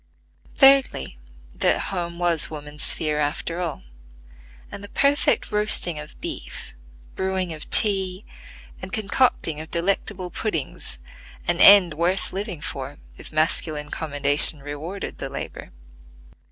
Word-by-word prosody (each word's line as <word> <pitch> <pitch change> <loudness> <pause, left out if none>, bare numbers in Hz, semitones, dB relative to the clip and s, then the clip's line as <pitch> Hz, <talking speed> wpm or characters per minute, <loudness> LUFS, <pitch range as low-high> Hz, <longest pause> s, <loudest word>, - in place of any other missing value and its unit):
Thirdly, 270 - +3 0.3
that - - +1
home 170 -2 -4
was 170 -2 +2
woman's 150 -1 -8
sphere 150 -1 +1
after 150 +3 -3
all, 170 -3 -5 0.9
and 200 - -9
the 205 - -9
perfect 280 +4 +1
roasting 210 -6 +2
of 150 0 -11
beef, - - -7 0.4
brewing 190 -2 -2
of 155 - -10
tea, 190 -2 +1 0.6
and 185 - -8
concocting 200 - 0
of 160 - -10
delectable 180 +1 -1
puddings, 160 - -4 0.5
an 175 0 0
end 195 -5 +8
worth 175 +4 -1
living 195 -4 -5
for 140 +1 -6 0.2
if - - -11
masculine 155 -1 -1
commendation 145 0 +5
rewarded 155 +7 -7
the - - -5
labor. - - -8
170 Hz, 120 wpm, -23 LUFS, 150-195 Hz, 0.9 s, end